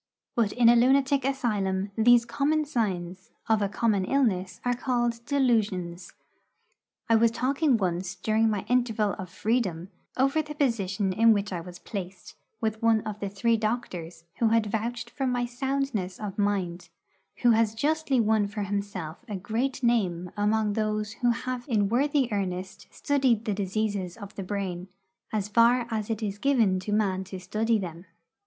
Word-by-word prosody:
But 225 Hz, -4 st, +2 dB
in 245 Hz, -2 st, +4 dB
a 240 Hz, -, +8 dB
lunatic 270 Hz, +3 st, +3 dB
asylum 205 Hz, -8 st, -1 dB
these 235 Hz, +1 st, +5 dB
common 295 Hz, +6 st, 0 dB
signs 185 Hz, -, -3 dB, 0.2 s
of 220 Hz, -2 st, +3 dB
a 200 Hz, -, +1 dB
common 205 Hz, -1 st, +1 dB
illness 195 Hz, -8 st, 0 dB
are 245 Hz, -, +2 dB
called 240 Hz, -1 st, -1 dB
'delusions.' 210 Hz, -10 st, 0 dB, 0.9 s
I 230 Hz, -, +4 dB
was 230 Hz, +1 st, +5 dB
talking 265 Hz, +3 st, +1 dB
once, 180 Hz, -1 st, -2 dB
during 220 Hz, +4 st, +1 dB
my 205 Hz, -2 st, -2 dB
interval 225 Hz, -4 st, +1 dB
of 185 Hz, -2 st, -6 dB
freedom, 190 Hz, -6 st, -1 dB, 0.3 s
over 275 Hz, +4 st, +3 dB
the 300 Hz, 0 st, -8 dB
position 205 Hz, -8 st, 0 dB
in 225 Hz, +3 st, +5 dB
which 205 Hz, -1 st, -2 dB
I 175 Hz, -, -3 dB
was 175 Hz, +1 st, -10 dB
placed, 185 Hz, -2 st, -7 dB, 0.3 s
with 220 Hz, -1 st, -2 dB
one 225 Hz, -1 st, +4 dB
of 210 Hz, -1 st, -6 dB
the 200 Hz, -, -3 dB
three 230 Hz, +4 st, +1 dB
doctors 190 Hz, -7 st, -3 dB, 0.2 s
who 230 Hz, -, +4 dB
had 225 Hz, 0 st, +3 dB
vouched 230 Hz, +3 st, -3 dB
for 270 Hz, -2 st, -2 dB
my 245 Hz, -1 st, 0 dB
soundness 245 Hz, -6 st, -2 dB
of 205 Hz, -3 st, -5 dB
mind, 190 Hz, -4 st, -1 dB, 0.5 s
who 240 Hz, -, +6 dB
has 225 Hz, -1 st, +2 dB
justly 290 Hz, +1 st, +1 dB
won 215 Hz, -2 st, +2 dB
for 205 Hz, +1 st, -4 dB
himself 200 Hz, -4 st, -4 dB
a 210 Hz, -, -3 dB
great 235 Hz, +8 st, -2 dB
name 185 Hz, -7 st, +1 dB
among 210 Hz, 0 st, +1 dB
those 215 Hz, 0 st, -1 dB
who 245 Hz, -, +3 dB
have 250 Hz, +1 st, -2 dB
in 210 Hz, -6 st, +1 dB
worthy 275 Hz, +3 st, +2 dB
earnest 190 Hz, -2 st, -3 dB
studied 260 Hz, -6 st, +1 dB
the 210 Hz, -, 0 dB
diseases 200 Hz, -2 st, -2 dB
of 200 Hz, -2 st, -9 dB
the -, -, -6 dB
brain, 185 Hz, -2 st, -4 dB, 0.4 s
as 210 Hz, -2 st, -1 dB
far 235 Hz, +3 st, +4 dB
as 215 Hz, -1 st, -2 dB
it 225 Hz, 0 st, -2 dB
is 205 Hz, -1 st, -3 dB
given 225 Hz, -9 st, +2 dB
to 200 Hz, +3 st, -5 dB
man 195 Hz, -3 st, +1 dB
to 190 Hz, 0 st, -7 dB
study 215 Hz, +5 st, 0 dB
them. 175 Hz, -2 st, -7 dB
215 Hz, 165 wpm, -27 LUFS, 195-240 Hz, 0.9 s, a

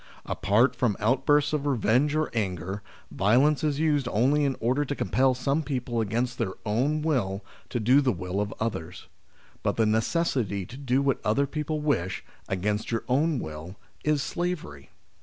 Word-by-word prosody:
Apart 105 Hz, +6 st, +2 dB
from 115 Hz, -6 st, +1 dB
outbursts 135 Hz, +6 st, +2 dB
of 145 Hz, -1 st, 0 dB
revenge 135 Hz, +3 st, +2 dB
or 155 Hz, 0 st, 0 dB
anger, 95 Hz, -3 st, -2 dB, 0.3 s
violence 130 Hz, +10 st, +3 dB
is 150 Hz, -2 st, 0 dB
used 150 Hz, -5 st, +2 dB
only 135 Hz, +7 st, +2 dB
in 135 Hz, -2 st, 0 dB
order 125 Hz, +6 st, +1 dB
to 145 Hz, 0 st, -3 dB
compel 130 Hz, +6 st, +2 dB
some 140 Hz, +4 st, 0 dB
people 125 Hz, -5 st, -2 dB
against 120 Hz, +4 st, -1 dB
tbeir 95 Hz, -, -1 dB
own 135 Hz, +9 st, +1 dB
will 100 Hz, -11 st, -1 dB, 0.2 s
to 120 Hz, -, -2 dB
do 125 Hz, +6 st, +5 dB
the 130 Hz, -2 st, +2 dB
will 90 Hz, 0 st, -3 dB
of 105 Hz, 0 st, -2 dB
others. 90 Hz, -7 st, -4 dB, 0.6 s
But -, -, -1 dB
the 115 Hz, -, +3 dB
necessity 110 Hz, -, 0 dB
to 120 Hz, -, -11 dB
do 135 Hz, -1 st, +1 dB
what 135 Hz, -3 st, 0 dB
other 125 Hz, +7 st, +2 dB
people 150 Hz, +1 st, -3 dB
wish, 95 Hz, -, -1 dB, 0.2 s
against 105 Hz, +3 st, -1 dB
your 115 Hz, -1 st, -1 dB
own 145 Hz, +4 st, +2 dB
will, 80 Hz, 0 st, -6 dB, 0.3 s
is 150 Hz, -2 st, +1 dB
slavery. 165 Hz, -, -4 dB
125 Hz, 165 wpm, -27 LUFS, 105-145 Hz, 0.6 s, do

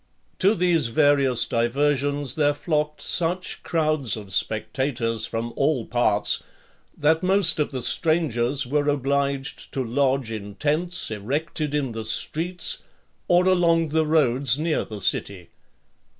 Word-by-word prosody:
To 200 Hz, +4 st, +3 dB
these 170 Hz, -6 st, +2 dB
various 140 Hz, -1 st, +2 dB
diversions 140 Hz, +3 st, 0 dB
there 145 Hz, -1 st, +1 dB
flocked 150 Hz, -1 st, -2 dB
such 175 Hz, 0 st, -1 dB
crowds 155 Hz, -, 0 dB
of 100 Hz, -3 st, -8 dB
spectators 115 Hz, +1 st, -1 dB
from 115 Hz, +1 st, -4 dB
all 135 Hz, -5 st, 0 dB
parts, 110 Hz, -3 st, +1 dB, 0.6 s
that 160 Hz, +2 st, +2 dB
most 190 Hz, -3 st, +3 dB
of 150 Hz, -, 0 dB
the 130 Hz, -4 st, -5 dB
strangers 145 Hz, -5 st, +1 dB
were 145 Hz, +3 st, 0 dB
obliged 140 Hz, 0 st, -2 dB
to 135 Hz, -, -1 dB
lodge 130 Hz, 0 st, 0 dB
in 105 Hz, -2 st, -7 dB
tents 160 Hz, -, -1 dB
erected 145 Hz, +7 st, -3 dB
in 140 Hz, -4 st, -1 dB
the 110 Hz, 0 st, -5 dB
streets, 165 Hz, +10 st, 0 dB, 0.5 s
or 175 Hz, +1 st, +3 dB
along 170 Hz, -3 st, +3 dB
the 160 Hz, +1 st, +1 dB
roads 135 Hz, -4 st, +3 dB
near 155 Hz, 0 st, -1 dB
the 105 Hz, -2 st, -8 dB
city. 95 Hz, -3 st, -1 dB
145 Hz, 130 wpm, -23 LUFS, 120-160 Hz, 0.6 s, To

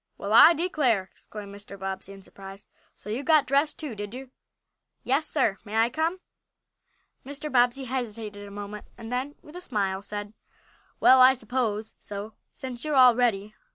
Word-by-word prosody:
"Well, 200 Hz, +2 st, -3 dB
I 320 Hz, +9 st, +9 dB
declare!" 275 Hz, -, 0 dB
exclaimed 205 Hz, -2 st, -10 dB
Mr. 200 Hz, 0 st, -11 dB
Bobbsey, 190 Hz, 0 st, -5 dB
in 195 Hz, -1 st, -12 dB
surprise. 195 Hz, +1 st, -12 dB, 0.3 s
"So 210 Hz, -, -9 dB
you 235 Hz, +5 st, -2 dB
got 305 Hz, +1 st, +4 dB
dressed 285 Hz, +3 st, +1 dB
too, 300 Hz, -6 st, -5 dB
did 205 Hz, +2 st, -7 dB
you?" 260 Hz, 0 st, -9 dB, 0.7 s
"Yes, 275 Hz, +5 st, 0 dB
sir. 225 Hz, -9 st, 0 dB
May 215 Hz, 0 st, -7 dB
I 225 Hz, +2 st, +3 dB
come?" 325 Hz, +6 st, -1 dB, 1.0 s
Mr. 290 Hz, +2 st, -6 dB
Bobbsey 245 Hz, +1 st, +3 dB
hesitated 220 Hz, -5 st, -5 dB
a -, -, -10 dB
moment, 205 Hz, +1 st, -8 dB
and 230 Hz, 0 st, -9 dB
then, 265 Hz, +4 st, -3 dB
with 300 Hz, -, -14 dB
a 360 Hz, -, -7 dB
smile, 195 Hz, -, -2 dB
said: 205 Hz, 0 st, -6 dB, 0.7 s
"Well, 260 Hz, 0 st, +7 dB
I 260 Hz, +1 st, +8 dB
suppose 220 Hz, -3 st, -2 dB
so, 205 Hz, +2 st, -7 dB, 0.2 s
since 250 Hz, -2 st, -6 dB
you 305 Hz, -1 st, -2 dB
are -, -, +2 dB
all 250 Hz, -2 st, +7 dB
ready. 215 Hz, -4 st, 0 dB
230 Hz, 175 wpm, -26 LUFS, 205-265 Hz, 1.0 s, I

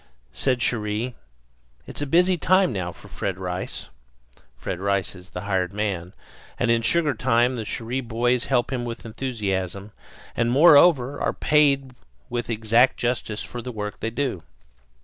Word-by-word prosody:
Said 130 Hz, -2 st, 0 dB
Cherrie: 110 Hz, +2 st, -1 dB, 0.7 s
"It's -, -, -7 dB
a 145 Hz, -, -2 dB
busy 180 Hz, +5 st, +4 dB
time 185 Hz, -2 st, +3 dB
now 90 Hz, -3 st, -3 dB
for -, -, -15 dB
Fred 95 Hz, -2 st, -4 dB
Rice" 90 Hz, 0 st, -5 dB, 0.7 s
Fred 85 Hz, -, -4 dB
Rice 100 Hz, -1 st, -1 dB
is 90 Hz, 0 st, -14 dB
the 90 Hz, -, -6 dB
hired 95 Hz, -1 st, -1 dB
man, 100 Hz, -4 st, -3 dB, 0.4 s
and 120 Hz, -1 st, +1 dB
in 115 Hz, 0 st, +3 dB
sugar 155 Hz, +4 st, +2 dB
time 120 Hz, +2 st, +2 dB
the 115 Hz, -3 st, -4 dB
Cherrie 120 Hz, +4 st, -3 dB
boys 120 Hz, +2 st, 0 dB
help 135 Hz, -1 st, 0 dB
him 125 Hz, -2 st, -2 dB
with 120 Hz, -1 st, -6 dB
enthusiasm, 105 Hz, -5 st, -3 dB, 0.4 s
and, 115 Hz, 0 st, +1 dB
moreover, 145 Hz, -1 st, +5 dB
are -, -, 0 dB
paid 140 Hz, -3 st, +2 dB, 0.4 s
with 120 Hz, -1 st, -3 dB
exact 115 Hz, +3 st, +3 dB
justice 120 Hz, -3 st, -2 dB
for 120 Hz, -, -7 dB
the 125 Hz, +2 st, -6 dB
work 105 Hz, -2 st, -5 dB
they 115 Hz, -, -2 dB
do. 120 Hz, -6 st, -2 dB
115 Hz, 155 wpm, -24 LUFS, 105-130 Hz, 0.7 s, moreover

